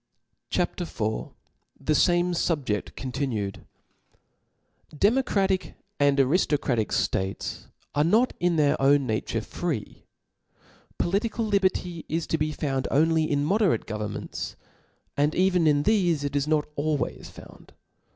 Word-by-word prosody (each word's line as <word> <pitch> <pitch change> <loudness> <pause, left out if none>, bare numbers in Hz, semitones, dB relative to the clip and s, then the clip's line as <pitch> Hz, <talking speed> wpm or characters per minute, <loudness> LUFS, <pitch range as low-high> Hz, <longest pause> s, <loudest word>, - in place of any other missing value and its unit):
CHAP. 180 0 -1
IV. 175 - -7
T/ie 110 +7 -4
fame 175 +3 +3
SubjeSi 145 - -1
continued 125 -7 -3 1.3
DEMOCRATIC 200 - +1 0.2
and 145 -1 +3
ariftocratic 135 - +2
ftates 95 +1 -2 0.3
are 145 - +3
not 220 +10 +3
in 175 -1 +2
their 145 -3 +2
own 140 0 +4
nature 110 -3 -1
free. - - -5 0.9
Political 220 +5 0
liberty 185 -4 0
is 165 +1 -1
to 160 - -1
be 155 0 0
found 135 -3 -2
only 160 +1 +2
in 145 -1 +1
moderate 190 - +2
governments: 105 -1 -5 0.6
and 145 +2 +1
even 180 -3 +3
in 145 -1 +3
thefe, 175 -8 +2
it 145 0 -3
is 145 0 +1
not 155 -1 +2
always 150 0 -2
found. - - -15
155 Hz, 120 wpm, -26 LUFS, 140-180 Hz, 1.3 s, own